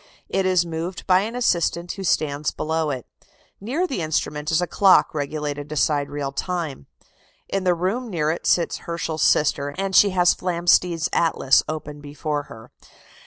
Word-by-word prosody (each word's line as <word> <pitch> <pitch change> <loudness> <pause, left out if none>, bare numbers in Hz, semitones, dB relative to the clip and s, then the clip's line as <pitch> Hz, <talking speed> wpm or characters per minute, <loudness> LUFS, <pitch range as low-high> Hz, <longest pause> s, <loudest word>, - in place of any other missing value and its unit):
It 190 -1 0
is 180 -2 +3
moved 170 +2 -5
by 185 -1 +5
an 220 +5 -3
assistant, 175 -6 0
who 195 - -7
stands 150 -4 0
below 160 0 -2
it.... 130 -4 -4 0.5
Near 270 - -1
the 265 - -3
instrument 155 -1 -2
is 160 - +2
a 180 - +1
clock 190 +2 +4
regulated 145 0 -4
to 155 - -5
sidereal 145 -2 0
time.... 160 - -4 0.6
In 195 -1 -2
the 180 -1 +3
room 205 +8 -2
near 155 -5 0
it 165 - -4
sits 170 - +2
Herschel's 165 -2 -3
sister, 145 -1 +2
and 195 0 -2
she 205 - +7
has 180 -2 +3
Flamsteed's 175 -2 +1
atlas 160 -5 +3
open 150 -1 -6
before 145 0 -4
her. 110 0 -13
165 Hz, 165 wpm, -22 LUFS, 150-185 Hz, 0.6 s, she